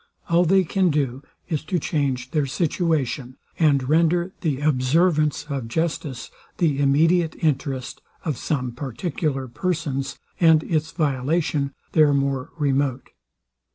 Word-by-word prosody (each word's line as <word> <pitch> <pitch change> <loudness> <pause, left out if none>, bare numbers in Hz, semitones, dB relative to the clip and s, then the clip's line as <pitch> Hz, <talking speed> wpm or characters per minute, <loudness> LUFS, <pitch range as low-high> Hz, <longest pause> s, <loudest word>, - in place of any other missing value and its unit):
All 170 +1 +4
they 190 +3 +4
can 185 +1 +1
do 140 -4 -1 0.3
is 155 -4 -2
to 180 - 0
change 135 -5 -1
their 150 -3 +1
situation, 145 -5 -1 0.2
and 140 -5 +3
render 170 +4 +2
the 150 -6 -1
observance 150 +2 +2
of 135 -5 -3
justice 145 -2 -3 0.3
the 150 -5 +1
immediate 160 +4 +3
interest 135 -4 -2 0.2
of 155 -4 0
some 130 -2 -2
particular 135 +2 -3
persons, 150 -1 -2 0.2
and 160 -2 +5
its 160 -1 -1
violation 145 -1 0 0.2
their 150 -3 +4
more 135 -2 -1
remote. 140 -3 0
150 Hz, 120 wpm, -23 LUFS, 135-165 Hz, 0.3 s, and